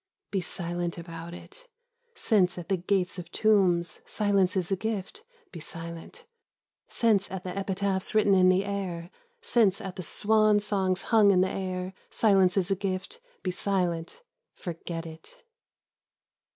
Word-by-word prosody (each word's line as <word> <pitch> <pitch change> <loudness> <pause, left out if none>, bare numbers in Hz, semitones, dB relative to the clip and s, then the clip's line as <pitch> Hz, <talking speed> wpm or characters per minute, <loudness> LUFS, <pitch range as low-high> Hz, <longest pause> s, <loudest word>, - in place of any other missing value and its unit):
Be 195 - 0
silent 175 0 -3
about 170 0 -8
it; - - -13 0.5
since 195 - +2
at 175 +1 -7
the 195 - +3
gates 180 +1 0
of 175 -1 -9
tombs 185 -5 +2
silence 200 -3 +1
is 185 0 -1
a - - +3
gift, 220 - -4 0.3
be - - -8
silent; 170 - -6 0.6
since 215 -4 +2
at 190 -1 -6
the 180 0 -5
epitaphs 195 0 -1
written 210 -2 +5
in 185 -1 +6
the 185 +2 +3
air, 185 -4 -4 0.3
since 225 - +3
at 190 -1 -7
the - - -3
swan 215 +3 +3
songs 190 -3 0
hung 215 -2 +7
in 185 -2 +5
the 185 - +1
air, 185 -1 -4 0.2
silence 195 -3 +3
is 185 -1 +1
a - - +3
gift, 195 - -4 0.2
be 185 - -1
silent; 180 - -1 0.3
forget 170 -1 -6
it. 160 0 -12
190 Hz, 150 wpm, -28 LUFS, 175-200 Hz, 0.6 s, hung